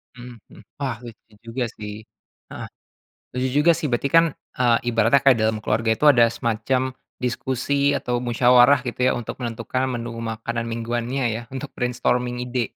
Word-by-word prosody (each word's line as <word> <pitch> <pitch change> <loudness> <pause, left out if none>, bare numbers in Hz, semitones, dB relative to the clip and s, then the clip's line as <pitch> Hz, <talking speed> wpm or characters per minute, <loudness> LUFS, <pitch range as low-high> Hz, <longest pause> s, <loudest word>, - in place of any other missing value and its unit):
Mhm 120 0 -10 0.2
mhm, - - -15 0.2
wah 130 -4 -2
lucu 115 -1 -13
juga 120 +2 -3
sih 105 0 -7 0.5
heeh. - - -7 0.7
Lucu 125 +1 -1
juga 165 +3 +5
sih, 155 - -2
berarti 120 +3 0
kan, 165 - +7 0.3
eee, 120 -2 +4
ibaratnya 135 +5 +4
dalam 110 -1 0
keluarga 110 +1 0
itu 150 - 0
ada 120 -4 +5
semacam 125 +3 -1 0.3
diskusi, 140 +3 0
atau 125 -2 -2
musyawarah 125 +2 +5
gitu 120 - -5
ya - - +4
untuk 120 - -7
menentukan 120 +2 -2
menu 120 0 -5
makanan 115 +1 -4
mingguannya 120 +3 -2
ya 115 - -4
untuk 135 +1 -6
brainstorming 125 0 -1
ide. 125 -2 -3
120 Hz, 155 wpm, -22 LUFS, 115-130 Hz, 0.7 s, kan